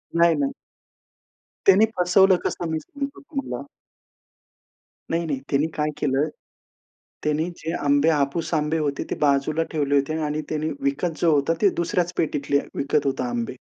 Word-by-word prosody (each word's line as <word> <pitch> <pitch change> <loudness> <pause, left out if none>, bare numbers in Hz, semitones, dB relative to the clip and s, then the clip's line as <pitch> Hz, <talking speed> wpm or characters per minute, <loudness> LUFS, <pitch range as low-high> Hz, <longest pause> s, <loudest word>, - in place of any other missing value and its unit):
नाही, 170 -1 +5
नाही. 140 -2 0 1.2
त्यांनी 195 +3 +7
फसवलं 185 +2 +5
कसं 170 - -2
मी 160 - 0
सांगतो 280 - -6
तुम्हाला. 275 - -5 1.5
नाही, 165 +1 0
नाही, 140 -4 -2
त्यांनी 145 +3 +2
काय 150 0 0
केलं, 145 0 +1 1.0
त्यांनी 150 +3 0
जे 160 +1 -4
आंबे, 145 +2 +3
हापूस 150 +2 0
आंबे 155 +1 +1
होते, 145 -2 -1
ते - - -1
बाजूला 145 +2 +2
ठेवले 145 -3 +1
होते 140 +3 +1
आणि 150 +1 -2
त्यांनी 155 0 -1
विकत 145 +4 -1
जो 165 -2 +4
होता 145 +3 +2
ते 205 - +6
दुसऱ्याच 175 0 0
पेटीतले 140 -2 +1 0.2
विकत 140 0 0
होता 130 -2 -1
आंबे. 120 +1 -3
155 Hz, 150 wpm, -24 LUFS, 140-170 Hz, 1.5 s, त्यांनी